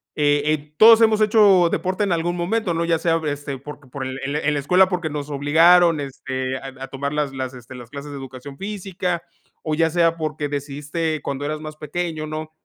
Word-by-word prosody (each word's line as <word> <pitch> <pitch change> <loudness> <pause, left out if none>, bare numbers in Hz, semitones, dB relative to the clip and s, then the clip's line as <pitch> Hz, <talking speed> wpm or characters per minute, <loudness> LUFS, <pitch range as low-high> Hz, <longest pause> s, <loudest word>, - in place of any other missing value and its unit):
eh 145 -1 +2
eh, 150 0 -2
todos 225 +3 +8
hemos 220 -1 +4
hecho 205 -5 +5
deporte 185 +3 -1
en 195 - 0
algún 175 +1 0
momento", 185 +2 -1
¿no?, 170 +1 0
ya 165 -1 +1
sea, 165 0 +1
este, 145 -1 -4
porque 145 +1 -11
por 135 0 -5
el 130 +1 -5
el 140 +2 -2
en 150 0 0
la 145 - 0
escuela 180 +7 +4
porque 175 -4 -2
nos 145 -1 -5
obligaron, 165 +3 +5
este, 130 -1 -4
a 135 0 -8
a - - -5
tomar 140 +2 -4
las 150 -2 -1
las, 130 -1 -4
este, 125 +1 -12
las 120 -2 -11
clases 145 +1 -8
de 140 - -6
educación 135 +1 -9
física, 190 -3 -3 0.4
o 155 -1 -1
ya 165 +1 +2
sea 165 0 +2
porque 155 -2 -3
decidiste 145 +2 -3
cuando 140 0 -3
eras 155 +1 -3
más 155 0 -7
pequeño, 155 0 -4
¿no?, 155 0 -6
155 Hz, 215 wpm, -22 LUFS, 140-175 Hz, 0.4 s, todos